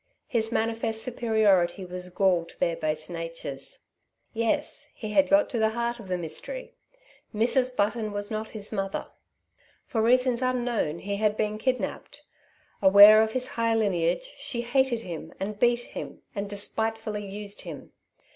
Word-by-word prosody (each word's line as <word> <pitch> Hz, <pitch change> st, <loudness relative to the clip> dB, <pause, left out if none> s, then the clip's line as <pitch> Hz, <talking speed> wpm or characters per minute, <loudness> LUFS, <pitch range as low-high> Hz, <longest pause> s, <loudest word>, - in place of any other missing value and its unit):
His 225 Hz, -2 st, -1 dB
manifest 225 Hz, -1 st, 0 dB
superiority 210 Hz, -7 st, +2 dB
was 180 Hz, 0 st, -5 dB
gall 180 Hz, -2 st, +2 dB
to -, -, -17 dB
their 170 Hz, -, +1 dB
base 155 Hz, -1 st, -2 dB
natures. 165 Hz, -5 st, -6 dB, 0.5 s
Yes, 230 Hz, -1 st, 0 dB
he 215 Hz, -2 st, -6 dB
had 285 Hz, +6 st, +3 dB
got 300 Hz, +1 st, +5 dB
to 240 Hz, -, -1 dB
the 220 Hz, 0 st, +3 dB
heart 235 Hz, 0 st, -1 dB
of 215 Hz, -, -10 dB
the 180 Hz, -1 st, -1 dB
mystery. 180 Hz, -, -5 dB, 0.6 s
Mrs. 250 Hz, +3 st, +2 dB
Button 215 Hz, +1 st, 0 dB
was 205 Hz, +1 st, -4 dB
not 215 Hz, 0 st, -3 dB
his 210 Hz, -2 st, -3 dB
mother. 195 Hz, -2 st, -3 dB, 0.8 s
For 225 Hz, -, -1 dB
reasons 250 Hz, +1 st, +3 dB
unknown 245 Hz, -10 st, 0 dB
he 200 Hz, +3 st, -4 dB
had 215 Hz, 0 st, +1 dB
been 215 Hz, 0 st, -1 dB
kidnapped. 255 Hz, +2 st, -3 dB, 0.6 s
Aware 205 Hz, +2 st, +9 dB
of 220 Hz, 0 st, 0 dB
his 255 Hz, 0 st, -1 dB
high 230 Hz, -1 st, 0 dB
lineage, 210 Hz, -, 0 dB
she 235 Hz, -3 st, -3 dB
hated 245 Hz, -1 st, +1 dB
him 165 Hz, -5 st, -8 dB
and 205 Hz, +2 st, -4 dB
beat 240 Hz, +1 st, +3 dB
him -, -, -8 dB
and 200 Hz, -1 st, -4 dB
despitefully 215 Hz, +1 st, -1 dB
used 205 Hz, +1 st, -5 dB
him. -, -, -9 dB
215 Hz, 155 wpm, -27 LUFS, 195-235 Hz, 0.8 s, Aware